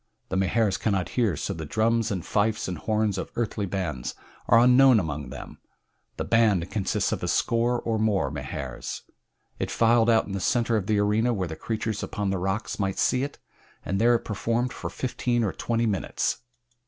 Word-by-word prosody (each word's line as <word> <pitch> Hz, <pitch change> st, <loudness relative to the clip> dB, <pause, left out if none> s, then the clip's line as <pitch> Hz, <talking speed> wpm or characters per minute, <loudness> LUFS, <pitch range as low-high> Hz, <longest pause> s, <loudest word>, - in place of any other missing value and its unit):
The -, -, -2 dB
Mahars 95 Hz, +1 st, +1 dB
cannot 100 Hz, -5 st, 0 dB
hear, 110 Hz, -, +1 dB
so -, -, -3 dB
the 80 Hz, -, -6 dB
drums 110 Hz, +7 st, +1 dB
and 95 Hz, -5 st, -3 dB
fifes 110 Hz, +1 st, 0 dB
and 90 Hz, -3 st, -4 dB
horns 110 Hz, -3 st, 0 dB
of -, -, -5 dB
earthly 105 Hz, -3 st, -2 dB
bands 85 Hz, -10 st, -3 dB, 0.3 s
are 115 Hz, -, +6 dB
unknown 125 Hz, 0 st, +6 dB
among 75 Hz, -6 st, -4 dB
them. 65 Hz, +1 st, -9 dB, 0.6 s
The -, -, -2 dB
"band" 105 Hz, -7 st, +2 dB
consists 100 Hz, -3 st, 0 dB
of -, -, -2 dB
a -, -, -2 dB
score 120 Hz, +1 st, +1 dB
or 115 Hz, -2 st, -1 dB
more 100 Hz, -10 st, +1 dB
Mahars. 70 Hz, -3 st, -5 dB, 0.6 s
It -, -, -2 dB
filed 115 Hz, 0 st, +3 dB
out 115 Hz, -1 st, +4 dB
in -, -, -8 dB
the 100 Hz, -, -2 dB
center 115 Hz, +4 st, +1 dB
of 105 Hz, -3 st, -1 dB
the 110 Hz, -1 st, +2 dB
arena 110 Hz, +4 st, +2 dB
where 95 Hz, -3 st, -2 dB
the 80 Hz, -, -6 dB
creatures 110 Hz, +3 st, -3 dB
upon 100 Hz, -2 st, -2 dB
the 95 Hz, -, -1 dB
rocks 95 Hz, +5 st, -2 dB
might 95 Hz, -1 st, -1 dB
see 125 Hz, -, +2 dB
it, 140 Hz, +1 st, -4 dB, 0.5 s
and 95 Hz, +2 st, -1 dB
there 120 Hz, +1 st, +5 dB
it 115 Hz, -, -2 dB
performed 115 Hz, +4 st, -1 dB
for -, -, -5 dB
fifteen 120 Hz, -1 st, -1 dB
or 100 Hz, -, -1 dB
twenty 115 Hz, 0 st, -1 dB
minutes. 100 Hz, -4 st, -1 dB
110 Hz, 190 wpm, -26 LUFS, 95-115 Hz, 0.6 s, are